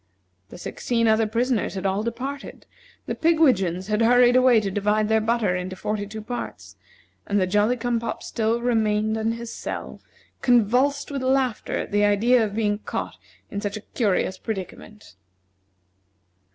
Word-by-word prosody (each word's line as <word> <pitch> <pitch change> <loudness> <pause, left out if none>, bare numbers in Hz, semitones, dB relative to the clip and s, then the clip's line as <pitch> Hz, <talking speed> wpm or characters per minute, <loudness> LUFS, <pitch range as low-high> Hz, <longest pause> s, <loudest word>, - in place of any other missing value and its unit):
The - - -11
sixteen 230 +5 -1
other 220 0 +3
prisoners 235 0 0
had 190 - -4
all 195 +1 +1
departed; 260 +5 -6 0.4
the - - -3
pigwidgeons 245 - +2
had 210 +2 0
hurried 245 +1 +5
away 255 -2 +6
to 200 -2 -3
divide 210 +2 +1
their 220 0 +3
butter 220 -4 +1
into 180 +1 -4
forty 210 +1 -3
two 215 +1 -8
parts, 245 +2 -7 0.5
and 205 0 +1
the 185 - +2
Jolly 210 +6 +2
cum 240 0 -1
pop 235 - -5
still 225 +1 -1
remained 220 -2 +1
in 220 +1 0
his 235 0 -7
cell, - - -6 0.4
convulsed 250 +5 +2
with 275 -2 -3
laughter 260 -3 0
at - - -4
the 205 0 +2
idea 225 +4 +4
of 205 -2 -3
being 210 -2 0
caught - - -5 0.3
in 200 - -3
such 205 0 -3
a - - -8
curious 190 -4 0
predicament. 210 - -7
220 Hz, 160 wpm, -24 LUFS, 205-245 Hz, 0.5 s, away